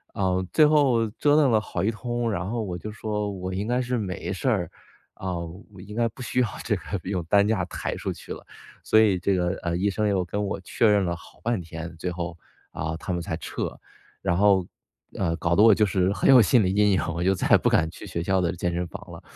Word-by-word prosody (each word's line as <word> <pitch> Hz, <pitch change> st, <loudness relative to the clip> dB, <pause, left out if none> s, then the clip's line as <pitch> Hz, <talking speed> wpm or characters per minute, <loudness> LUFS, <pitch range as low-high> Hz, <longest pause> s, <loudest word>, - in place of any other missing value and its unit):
呃， 95 Hz, -1 st, 0 dB
最 155 Hz, -, +6 dB
后 135 Hz, -7 st, +3 dB
折 145 Hz, +7 st, +2 dB
腾 140 Hz, -5 st, +4 dB
了 110 Hz, -, +3 dB
好 -, -, -4 dB
一 110 Hz, -, +2 dB
通， 120 Hz, +1 st, -3 dB
然 90 Hz, -1 st, -3 dB
后 115 Hz, 0 st, -2 dB
我 90 Hz, -4 st, -4 dB
就 110 Hz, +5 st, -7 dB
说： 105 Hz, -1 st, -3 dB
“我 95 Hz, +1 st, -4 dB
应 100 Hz, +3 st, -3 dB
该 125 Hz, +1 st, +1 dB
是 125 Hz, 0 st, -1 dB
没 95 Hz, -2 st, -4 dB
事 100 Hz, +7 st, -1 dB
儿， 95 Hz, -9 st, 0 dB, 0.4 s
啊， 95 Hz, -, -7 dB, 0.6 s
应 105 Hz, -, -8 dB
该 115 Hz, 0 st, +2 dB
不 125 Hz, -, -13 dB
需 125 Hz, -, 0 dB
要 120 Hz, -, +2 dB, 0.2 s
这 110 Hz, -, 0 dB
个 90 Hz, -, -7 dB, 0.2 s
用 90 Hz, -2 st, -2 dB
担 100 Hz, +4 st, +4 dB
架 110 Hz, 0 st, +1 dB
抬 -, -, -4 dB
出 -, -, -3 dB
去 -, -, -8 dB
了。” -, -, -11 dB, 0.4 s
所 110 Hz, -, +4 dB
以 105 Hz, -4 st, +4 dB
这 95 Hz, +2 st, +1 dB
个 90 Hz, -1 st, +1 dB
呃， 85 Hz, -1 st, -1 dB
医 100 Hz, +3 st, +1 dB
生 105 Hz, +1 st, 0 dB
又 95 Hz, -3 st, +1 dB
跟 105 Hz, +4 st, -3 dB
我 100 Hz, -, -3 dB
确 110 Hz, +5 st, +1 dB
认 100 Hz, -2 st, +3 dB
了 85 Hz, 0 st, -1 dB
好 85 Hz, -, -16 dB
半 115 Hz, -4 st, 0 dB
天， 80 Hz, 0 st, -8 dB
最 90 Hz, +2 st, -3 dB
后， 85 Hz, -1 st, -5 dB, 0.4 s
啊， 80 Hz, +1 st, -4 dB
他 90 Hz, -, -4 dB
们 85 Hz, -, -2 dB
才 80 Hz, 0 st, -4 dB
撤。 -, -, -5 dB, 0.4 s
然 85 Hz, -, +1 dB
后 100 Hz, -3 st, +4 dB, 0.5 s
呃， 85 Hz, -4 st, 0 dB
搞 85 Hz, 0 st, 0 dB
得 -, -, +6 dB
我 110 Hz, -2 st, +8 dB
就 105 Hz, -, +3 dB
是 95 Hz, -1 st, +1 dB
很 -, -, +1 dB
有 130 Hz, -2 st, +9 dB
心 110 Hz, +2 st, +4 dB
理 95 Hz, -, +1 dB
阴 105 Hz, 0 st, +4 dB
影， 95 Hz, -, +2 dB
我 85 Hz, -, -3 dB
就 95 Hz, -, +3 dB
再 -, -, -2 dB
也 -, -, +9 dB
不 -, -, +1 dB
敢 80 Hz, 0 st, +2 dB
去 -, -, -11 dB
学 85 Hz, -, -3 dB
校 95 Hz, +1 st, +1 dB
的 85 Hz, -1 st, -1 dB
健 85 Hz, 0 st, -2 dB
身 90 Hz, 0 st, -2 dB
房 100 Hz, -1 st, -10 dB
了。 85 Hz, -, -10 dB
100 Hz, 270 characters per minute, -25 LUFS, 90-110 Hz, 0.6 s, 有